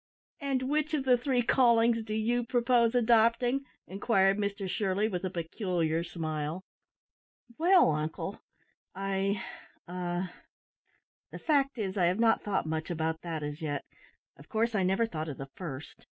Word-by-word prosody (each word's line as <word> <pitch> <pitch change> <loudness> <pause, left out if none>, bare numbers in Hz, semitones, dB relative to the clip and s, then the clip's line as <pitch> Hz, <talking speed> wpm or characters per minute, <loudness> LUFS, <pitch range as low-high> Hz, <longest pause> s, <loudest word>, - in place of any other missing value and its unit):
"And 275 -3 -1
which 305 +3 0
of 285 - -1
the 255 -1 +6
three 245 0 0
callings 235 -2 +4
do 215 -1 -4
you 235 +3 +1
propose 235 0 +2
adopting?" 240 +3 +3 0.2
inquired 195 0 +2
Mr 200 -1 -2
Shirley, 200 +2 0
with 185 -4 -3
a 185 - -1
peculiar 170 -2 -1
smile. 160 0 -4 1.0
"Well 355 - +5
uncle, 155 +1 -3 0.5
I 195 0 -1 0.4
a 175 0 -3 1.1
the - - -8
fact 280 -4 +1
is, 200 -3 -3
I 180 - +3
have 180 +4 +1
not 225 -1 +4
thought 205 -5 -1
much 160 +1 -3
about 160 -1 -2
that 165 -3 -4
as 150 +2 -5
yet. 145 -2 -2 0.5
Of 140 - -16
course, 225 +2 0
I 200 - +1
never 190 +5 +2
thought 160 -7 -4
of 140 - -6
the 135 0 -7
first. 155 -5 -7
195 Hz, 155 wpm, -30 LUFS, 170-235 Hz, 1.1 s, the